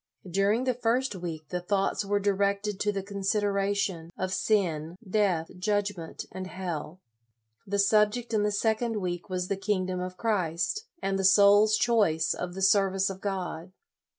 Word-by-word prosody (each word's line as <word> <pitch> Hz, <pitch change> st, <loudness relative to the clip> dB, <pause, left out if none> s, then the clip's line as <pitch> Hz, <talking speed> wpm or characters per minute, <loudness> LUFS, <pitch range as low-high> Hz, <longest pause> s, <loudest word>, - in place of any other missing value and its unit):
During 200 Hz, +6 st, +1 dB
the 255 Hz, -1 st, +1 dB
first 245 Hz, +1 st, 0 dB
week 165 Hz, -4 st, -6 dB
the 180 Hz, -1 st, -3 dB
thoughts 195 Hz, +2 st, 0 dB
were 205 Hz, 0 st, 0 dB
directed 200 Hz, 0 st, 0 dB
to 205 Hz, -, +1 dB
the 195 Hz, -1 st, -3 dB
consideration 200 Hz, -3 st, -1 dB
of 185 Hz, 0 st, -2 dB
sin, 175 Hz, -5 st, 0 dB
death, 185 Hz, -5 st, +1 dB
judgment, 205 Hz, -3 st, -2 dB
and 185 Hz, 0 st, -6 dB
hell. 175 Hz, -3 st, -5 dB, 0.7 s
The 200 Hz, +1 st, -1 dB
subject 210 Hz, +4 st, +2 dB
in 215 Hz, -, +2 dB
the 210 Hz, 0 st, +1 dB
second 220 Hz, +2 st, 0 dB
week 175 Hz, -2 st, -4 dB
was 180 Hz, -1 st, -2 dB
the 200 Hz, 0 st, -1 dB
Kingdom 185 Hz, -2 st, -1 dB
of 185 Hz, 0 st, -5 dB
Christ, 210 Hz, -, -1 dB, 0.2 s
and 195 Hz, 0 st, 0 dB
the -, -, 0 dB
soul's 205 Hz, +2 st, +6 dB
choice 205 Hz, -11 st, +2 dB
of 180 Hz, 0 st, -5 dB
the 195 Hz, -, -3 dB
service 195 Hz, 0 st, +3 dB
of 190 Hz, 0 st, -9 dB
God. 185 Hz, -3 st, -4 dB
195 Hz, 155 wpm, -28 LUFS, 185-210 Hz, 0.7 s, soul's